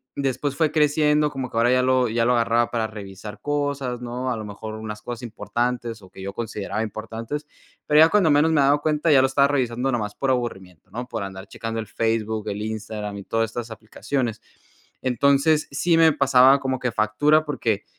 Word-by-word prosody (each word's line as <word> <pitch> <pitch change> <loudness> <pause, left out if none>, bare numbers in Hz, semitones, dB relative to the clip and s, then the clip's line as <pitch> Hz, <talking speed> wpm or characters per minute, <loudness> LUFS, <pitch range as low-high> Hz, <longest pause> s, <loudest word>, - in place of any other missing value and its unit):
después 140 0 -2
fue 160 -2 +1
creciendo, 150 0 +2
como 130 -3 -4
que - - -6
ahora 120 +2 +4
ya 125 0 +4
lo 130 -1 +2
ya 115 +1 +1
lo 125 - +3
agarraba 115 0 +2
para 115 -2 -1
revisar 105 -1 -9
cosas, 140 -4 -2
¿no?, 125 +1 -4
a 115 - -2
lo 110 - -6
mejor 110 +1 -7
unas 110 -1 -7
cosas 120 0 -7
importantes 120 -1 -3
o 95 - -14
que - - -12
yo 100 +1 -5
consideraba 110 -1 -4
importantes, 115 +7 -6 0.4
pero 150 0 +5
ya 160 - +7
cuando 190 -3 +3
menos 150 +2 +4
me 150 -3 +3
he - - +4
dado 145 +1 +3
cuenta, 155 +1 +1
ya 135 - +7
lo 135 - +3
estaba 140 +1 +3
revisando 130 -2 0
nomás 105 -4 -2
por 135 - -2
aburrimiento, 95 -9 -3
¿no?, 125 +2 -5
por 115 -4 -4
andar 95 0 -8
checando 115 +1 -5
el 110 - -5
Facebook, 110 -1 -1
el 100 +1 -4
Instagram 105 -1 -5
y 100 - -7
todas 115 +2 -1
estas 120 0 -6
aplicaciones, 110 +2 -4 0.6
entonces, 140 +4 +2
sí 165 +4 +2
me 160 -1 +6
pasaba 135 0 +5
como 130 -1 -2
que 125 -1 -1
factura 145 +9 +2
porque 115 -8 -2
120 Hz, 205 wpm, -23 LUFS, 110-140 Hz, 0.6 s, ya